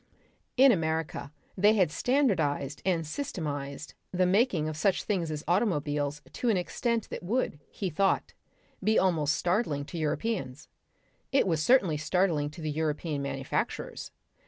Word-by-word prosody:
In 265 +1 +8
America 160 -6 -1 0.2
they 205 +3 +5
had 185 -7 +3
standardised 160 - +1
and 170 -4 +1
systematised 150 - -4 0.2
the 185 0 +2
making 190 -4 +2
of 155 - -3
such 190 +4 +1
things 185 -6 -1
as 150 -1 -4
automobiles 150 -7 0
to 245 - -1
an 215 - +3
extent 230 +5 -1
that - - -4
would, 200 - -1
he 190 -4 -4
thought, 195 +5 +1 0.5
be 220 +2 +3
almost 155 -6 +2
startling 175 -7 0
to 170 - -6
Europeans. 155 - -2 0.6
It 275 - +4
was 165 -5 +1
certainly 185 - +4
startling 155 -1 +1
to 150 +3 -11
the 155 -1 -2
European 155 -1 -2
manufacturers. 135 -1 -3
165 Hz, 140 wpm, -29 LUFS, 150-200 Hz, 0.6 s, In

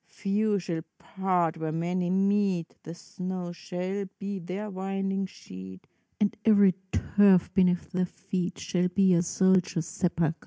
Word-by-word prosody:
few 205 +1 0
shall 175 -3 -3 0.2
part 180 -4 0
where 160 -1 -3
many 175 +2 -1
meet! 195 -2 +1
The 165 - -8
snow 180 0 -5
shall 185 +3 -4
be 195 -1 -4
their 190 +5 -5
winding 195 0 -2
sheet, 95 - -11 0.3
And 205 -1 +1
every 205 -4 +6 0.2
turf 200 -3 +4
beneath 180 -2 +2
their 180 0 0
feet 185 0 -4
Shall 180 0 0
be 190 0 +3
a 170 - +4
soldier's 180 -2 +2
sepulcher. 170 -2 0
185 Hz, 140 wpm, -28 LUFS, 175-195 Hz, 0.3 s, every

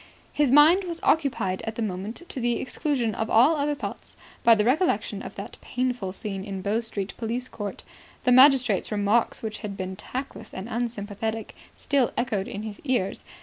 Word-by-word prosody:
His 295 -3 +2
mind 305 +8 +7
was 340 -2 -4
occupied 265 - +1
at 225 - -3
the 230 - -2
moment, 205 - -4
to 270 - -6
the 240 -1 0
exclusion 260 -5 -1
of 220 +2 -2
all 255 +9 +5
other 295 0 0
thoughts, - - -7 0.3
by 230 - +7
the 210 - +2
recollection 310 +9 +1
of - - -8
that - - -8
painful 245 -6 -2
scene 195 0 -5
in 195 -2 -5
Bow 205 +3 +1
Street 205 -4 -4
Police 240 +2 -3
Court. 205 -5 -6 0.4
The 250 - +3
magistrate's 255 -6 +5
remarks, 210 +3 +1
which 215 -1 -4
had 205 -3 -6
been 185 0 -4
tactless 260 +7 -7
and 190 +3 -5
unsympathetic, 225 -2 -3 0.2
still 275 -4 +1
echoed 215 -5 -1
in 205 - -5
his 215 -2 -7
ears. 250 -9 -1
230 Hz, 180 wpm, -26 LUFS, 205-260 Hz, 0.4 s, mind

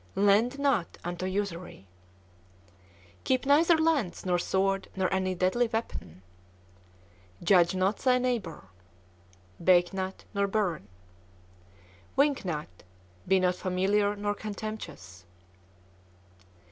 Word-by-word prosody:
Lend 205 +6 +3
not 275 -11 0
unto 175 +1 -4
usury. 185 - -4 1.4
Keep 255 +1 +1
neither 320 +4 +5
lance, 315 - 0
nor 180 -1 +1
sword, 195 +2 0
nor 190 -1 0
any 185 -1 0
deadly 190 +7 +1
weapon. 220 - -5 1.2
Judge 180 -2 +4
not 190 +3 +1
thy 255 -1 +3
neighbor. 240 -11 -2 1.0
Bake 175 +1 +4
not, 190 0 -4
nor 200 -1 +1
burn. 195 - -1 1.3
Wink 280 0 +2
not. 150 - -5 0.5
Be 190 +1 +4
not 180 0 +2
familiar 195 +3 0
nor 205 0 -2
contemptuous. 205 - -7
195 Hz, 100 wpm, -28 LUFS, 180-220 Hz, 1.4 s, neither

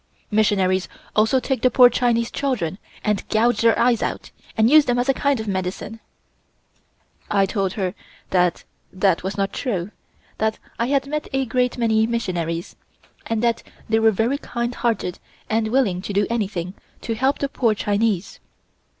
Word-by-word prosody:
Missionaries 190 -3 +2 0.3
also 220 +5 +4
take 260 -2 -2
the 255 - +4
poor 250 +1 +7
Chinese 235 -1 +1
children 215 - -2 0.2
and 210 -2 0
gouge 235 +3 +2
their 230 0 +4
eyes 240 -2 +3
out, - - -3 0.3
and 220 0 +5
use 300 +3 +7
them 245 0 +1
as 245 +1 0
a 270 - +4
kind 280 -1 +1
of 220 - -5
medicine." 190 +3 -3 1.3
I 195 -1 +3
told 195 -1 -1
her 185 -3 -2 0.4
that 180 -2 +2 0.3
that 185 -2 +2
was 190 +2 -4
not 195 0 -1
true; 200 -7 -2 0.5
that 220 0 0 0.2
I 235 - +1
had 275 0 +1
met 300 +2 -3
a 270 0 +1
great 250 0 0
many 220 -2 +2
missionaries, 175 -7 -3 0.5
and 225 0 -1
that 235 -1 +1 0.3
they 225 0 +2
were 225 0 +5
very 225 +7 0
kind 240 -3 -3
hearted 225 -7 -1 0.3
and 220 0 +1
willing 215 -7 +1
to 200 - -5
do 200 +1 +2
anything 190 -6 -2 0.3
to 230 - -2
help 265 +5 +1
the 280 - -1
poor 235 -5 +1
Chinese. 205 -2 -1
220 Hz, 165 wpm, -22 LUFS, 195-245 Hz, 1.3 s, poor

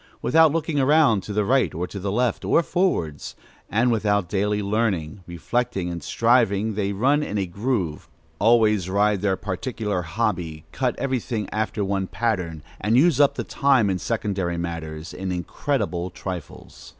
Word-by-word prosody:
Without 160 +2 +4
looking 160 -1 -1
around 140 -6 +4
to 105 - -8
the 105 0 0
right 130 -3 +2
or 85 +2 -2
to 100 - -7
the 100 +1 -3
left 120 +3 0
or 170 - +3
forwards, 85 - -1 0.3
and 120 +3 +2
without 105 -4 +1
daily 105 +2 0
learning, 100 -4 -1
reflecting, 95 +2 -2
and 85 -1 -5
striving, 110 -3 +2
they 100 -1 -1
run 135 +9 +2
in 105 -8 -3
a 100 - 0
groove, 95 - -2 0.3
always 105 -4 +3
ride 100 0 +2
their 95 -2 +1
particular 105 0 -3
hobby, 85 -4 -2
cut 130 -2 -1
every 130 -2 -1
thing 110 -3 -4
after 110 -1 -1
one 95 -1 -1
pattern, 90 -10 -2 0.2
and 110 +3 +2
use 150 0 +4
up 140 -1 +5
the - - -3
time 130 -8 +2
in 90 - -1
secondary 100 -6 -2
matters, 85 -1 -5
in 95 -1 -4
incredible 90 - -2
trifles. 90 -4 -8
105 Hz, 160 wpm, -23 LUFS, 90-120 Hz, 0.3 s, up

